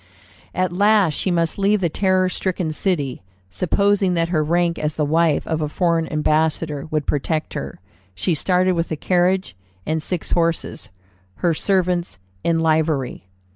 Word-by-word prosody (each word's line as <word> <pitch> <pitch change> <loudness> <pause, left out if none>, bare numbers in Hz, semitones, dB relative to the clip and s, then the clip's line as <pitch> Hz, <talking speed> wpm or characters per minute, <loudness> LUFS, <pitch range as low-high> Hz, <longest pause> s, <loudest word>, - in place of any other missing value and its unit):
At 185 -1 0
last 200 -3 +4
she 185 - -1
must 170 0 0
leave 205 +2 +3
the 180 - +1
terror 185 +2 +1
stricken 180 -3 -2
city. 150 -8 -1 0.3
Supposing 195 - +1
that 165 0 0
her 155 -3 +1
rank 170 +2 +1
as 150 0 -2
the 150 - 0
wife 160 0 +2
of 160 -1 -2
a 150 - -1
foreign 165 0 0
ambassador 155 -1 0
would 155 -2 -1
protect 155 +2 -1
her, 150 - -6 0.4
she 180 - 0
started 180 +4 +2
with 170 -2 -1
a - - 0
carriage 180 - +1 0.3
and 160 0 -1
six 175 +1 -3
horses, 170 -1 -1 0.6
her 170 - +4
servants 180 0 0 0.3
in 165 -1 +1
livery. 155 - 0
170 Hz, 155 wpm, -21 LUFS, 155-185 Hz, 0.6 s, last